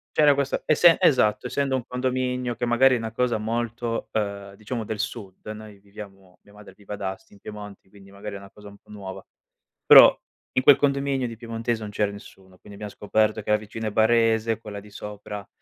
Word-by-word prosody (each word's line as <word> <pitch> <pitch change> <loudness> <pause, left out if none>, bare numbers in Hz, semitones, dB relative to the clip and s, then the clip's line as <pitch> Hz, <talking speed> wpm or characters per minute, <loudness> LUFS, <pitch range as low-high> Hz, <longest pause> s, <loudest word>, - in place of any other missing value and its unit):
C'era 150 -2 +5
questa 140 0 -2
essen 165 +2 +5
esatto, 110 -4 +3
essendo 135 0 -1
un 125 -2 -3
condominio 125 -1 -2
che 120 +1 -2
magari 130 +2 +4
è - - 0
una 110 -1 -5
cosa 120 0 0
molto, 115 +1 -3
ehm, 100 -2 -4
diciamo 110 +2 -5
del 105 0 -5
sud, 105 -3 -6
noi 105 -2 -12
viviamo 100 -2 -13
mia 100 - -21
madre 105 -2 -14
vive 105 0 -10
ad 100 - -8
Asti, 95 +1 -6
in 100 - -18
Piemonte, 105 -2 -10
quindi 100 -1 -17
magari, 100 0 -8
è - - -5
una 100 0 -13
cosa 105 0 -15
un 100 - -15
po' - - -31
nuova, 100 -3 -9 0.6
però - - +9 0.4
in 130 - +2
quel 145 - +8
condominio 140 -2 0
di 115 - -7
piemontese 115 -1 -3
non 105 -1 -6
c'era 105 -1 0
nessuno. 95 -2 -14
Quindi 100 - -15
abbiam 105 - -5
scoperto 110 +1 0
che - - -9
la 105 - +5
vicina 110 +1 -6
è - - -2
barese, 115 0 +2
quella 105 -2 -8
di 105 +1 -15
sopra 105 0 -8
110 Hz, 210 wpm, -24 LUFS, 100-120 Hz, 0.6 s, però